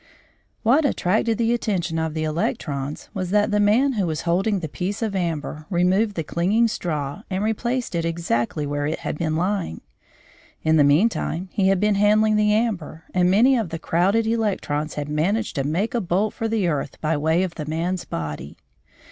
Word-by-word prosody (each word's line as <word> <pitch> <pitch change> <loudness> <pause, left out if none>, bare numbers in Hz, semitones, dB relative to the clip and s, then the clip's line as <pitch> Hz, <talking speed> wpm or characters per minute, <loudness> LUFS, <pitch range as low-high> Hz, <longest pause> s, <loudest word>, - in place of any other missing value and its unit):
What 265 +8 +4
attracted 220 -3 +1
the 235 0 +2
attention 180 -8 -1
of 160 -1 -2
the 155 - -1
electrons 150 -2 -3
was 185 -4 -3
that 210 +2 +2
the 210 - +2
man 230 +7 +3
who 200 -6 0
was 155 -1 -2
holding 190 +5 +1
the 165 - -4
piece 190 +8 -3
of 210 -3 -2
amber 155 -3 -3
removed 190 +4 +2
the 165 - -2
clinging 195 +9 +2
straw 150 -5 -3
and 190 +1 -1
replaced 235 +3 -1
it 170 -1 0
exactly 160 -4 -1
where 145 0 -2
it 155 - -3
had - - -4
been 160 -2 0
lying. 180 - -1 0.8
In 160 0 +3
the 150 - +6
meantime 175 +3 +1
he 195 -2 +1
had 195 -1 +3
been 210 +1 +3
handling 215 +1 +4
the 210 0 +3
amber, 205 -8 -1
and 180 -1 +3
many 235 +8 +5
of 225 -8 -1
the 165 - -4
crowded 190 +7 +1
electrons 200 -10 -1
had 145 -1 -3
managed 180 +9 0
to 135 - +1
make 175 +10 -1
a 240 - 0
bolt 195 +3 0
for 225 - -2
the 220 -5 0
earth 145 -4 -2
by 160 +1 0
way 160 +4 +2
of 185 -2 -3
the 150 -3 -6
man's 170 +3 -2
body. 75 -3 -6
180 Hz, 190 wpm, -23 LUFS, 155-210 Hz, 0.8 s, the